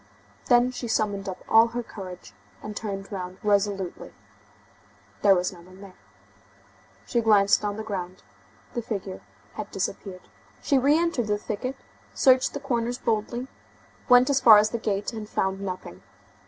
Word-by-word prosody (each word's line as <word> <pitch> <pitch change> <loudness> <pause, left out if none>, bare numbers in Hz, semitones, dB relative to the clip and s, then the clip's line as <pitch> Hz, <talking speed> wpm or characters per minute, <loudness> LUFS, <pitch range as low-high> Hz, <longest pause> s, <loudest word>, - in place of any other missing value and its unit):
Then 245 0 +4
she 245 -1 -6
summoned 205 -3 -1
up 185 - -8
all 225 +1 +6
her 240 +1 -4
courage, 185 -5 -10 0.3
and 210 0 -7
turned 195 -2 -5
round 185 -2 -6
resolutely. 200 -3 -1 1.1
There 200 -2 +6
was 180 +1 -1
no 175 - -14
one 185 +2 -16
there. 195 -2 -13 1.1
She 235 - 0
glanced 210 -2 +4
on 205 0 -2
the 220 - -4
ground. 185 -4 -6 0.5
The 240 - -2
figure 195 -4 -5 0.3
had - - -6
disappeared. 185 -3 -5 0.3
She 275 - +2
re 285 +4 +4
entered 335 -9 0
the 210 0 +1
thicket, 220 +6 -4 0.4
searched 260 +1 +4
the - - -3
corners 245 -3 -2
boldly, 235 +2 -2 0.6
went 250 +2 +6
as 275 - +2
far 220 -3 +9
as 215 +1 +3
the 235 - -2
gate, 205 0 -2
and 215 -2 -7
found 190 -1 -1
nothing. 180 - -6
210 Hz, 155 wpm, -25 LUFS, 195-240 Hz, 1.1 s, far